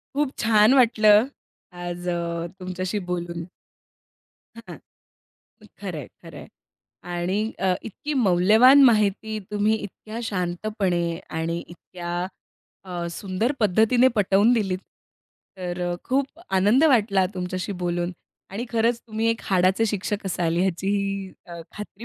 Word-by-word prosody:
खूप 285 -2 +1
छान 215 +2 +5
वाटलं. 220 -3 +5 0.5
आज 175 0 -5
अ, 170 -1 -2
तुमच्याशी 185 +2 -3
बोलून. 170 -1 -4 1.1
हां. 230 0 -10 1.0
खरं - - -5
आहे, - - -7 0.2
खरं - - -12
आहे. - - -11 0.6
आणि 175 +3 -1 0.2
अ, 185 -1 +2
इतकी 295 +8 -5
मौल्यवान 215 +10 +6
माहिती 215 -1 +2
तुम्ही 210 +1 +2
इतक्या 215 +2 -8
शांतपणे 180 -3 -2 0.2
आणि 165 +1 -2
इतक्या 175 0 -8 0.7
अ, 175 -2 -4
सुंदर 195 +8 -2
पद्धतीने 225 +5 +4
पटवून 200 +4 +4
दिलीत. 195 -6 0 0.8
तर 180 -1 -5
अ, - - -2
खूप 275 +4 -1
आनंद 205 +10 +4
वाटला 210 -9 +3
तुमच्याशी 185 +2 -3
बोलून. 175 +1 -1 0.4
आणि 205 +5 -4
खरंच 230 0 +1
तुम्ही 220 0 -2
एक 230 0 0
हाडाचे 190 +3 +2
शिक्षक 205 0 -3
असाल 170 -2 -1
ह्याची 190 +1 0 0.6
अ, 170 -1 -8
खात्री 210 +1 -9
195 Hz, 120 wpm, -24 LUFS, 175-220 Hz, 1.1 s, मौल्यवान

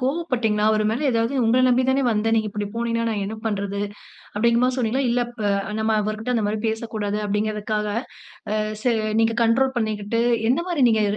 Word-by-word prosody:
கோபப்பட்டீங்களா? 255 -7 0
அவரு 215 0 +1
மேல 255 +6 -1
ஏதாவது 230 +3 0
உங்கள 245 +3 +3
நம்பி 250 +1 +3
தானே 265 +1 +2
வந்தேன். 225 +1 +1
நீங்க 215 -1 +1
இப்டி 205 0 -3
போனீங்கன்னா, 230 0 -1
நான் 205 -2 -2
என்ன 220 +2 -5
பண்றது? 200 -1 -2 0.5
அப்டிங்கற 235 +3 +2
மாரி 255 0 +2
சொன்னீங்களா? 255 +2 0
இல்ல 245 - +1 0.2
ப - - -8 0.4
நம்ம 220 0 +1
அவர்கிட்ட 215 +4 -2
அந்த 225 -3 +1
மாரி 215 - -1
பேசக்கூடாது 220 -2 -3
அப்டிங்கிறதுக்காக 210 +1 -1 0.6
ஆ - - +1 0.3
ச - - -15 0.4
நீங்க 225 0 +2
கண்ட்ரோல் 260 +3 +2
பண்ணிக்கிட்டு 215 -1 -1 0.3
எந்த 270 +7 +2
மாரி 330 -6 0
நீங்க 220 -2 +3
225 Hz, 175 wpm, -23 LUFS, 215-245 Hz, 0.6 s, உங்கள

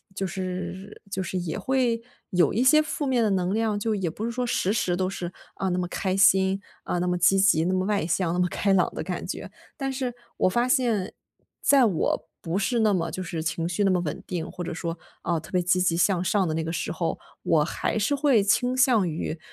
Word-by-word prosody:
就 195 - -2
是 185 +1 -5
就 190 - -2
是 185 0 -3
也 175 -3 -3
会 250 -3 +1 0.3
有 175 -6 +3
一 235 - +2
些 305 +4 +6
负 305 -1 -3
面 255 -3 +2
的 215 -2 +2
能 185 -1 0
量。 220 -1 0
就 220 +2 -1
也 190 -5 -1
不 205 - -7
是 235 - -1
说， 250 +1 -2
时 195 -4 +1
时 185 -5 +1
都 185 +1 0
是， 180 -2 -5 0.2
啊， 190 - -2
那 180 -1 0
么 180 - 0
开 190 0 -1
心， 195 0 +4 0.2
啊， 175 - -1
那 180 - 0
么 180 0 +1
积 180 +2 +4
极、 190 -5 +4
那 185 - +1
么 185 0 +1
外 200 -4 0
向、 175 0 0
那 175 - -1
么 180 - +3
开 200 - 0
朗 190 -2 +3
的 - - -3
感 - - -4
觉。 - - -6 0.2
但 270 -1 -3
是 260 -2 -3 0.2
我 - - +3
发 240 +6 +1
现， 235 -7 +1 0.5
在 275 -2 +5
我 190 -8 0
不 165 +2 -2
是 235 +4 +1
那 215 -2 +3
么 165 -3 -1
就 185 - -4
是 165 -3 -4
情 165 +1 -1
绪 180 +4 0
那 195 - +3
么 180 - +2
稳 155 -4 -4
定， 170 -3 -4
或 180 - -6
者 170 - -4
说， 165 0 -4 0.3
啊， 170 0 0
特 160 - -13
别 180 - +2
积 180 +1 +2
极 175 -2 +2
向 180 0 +2
上 190 0 +1
的 160 - -1
那 160 +1 -1
个 160 - -3
时 170 - -3
候， 170 -3 -2 0.2
我 155 -2 +3
还 195 - -2
是 220 +8 +1
会 275 -6 +3
倾 245 +6 +2
向 245 -7 +4
于， 160 +1 -3
190 Hz, 260 characters per minute, -25 LUFS, 175-220 Hz, 0.5 s, 些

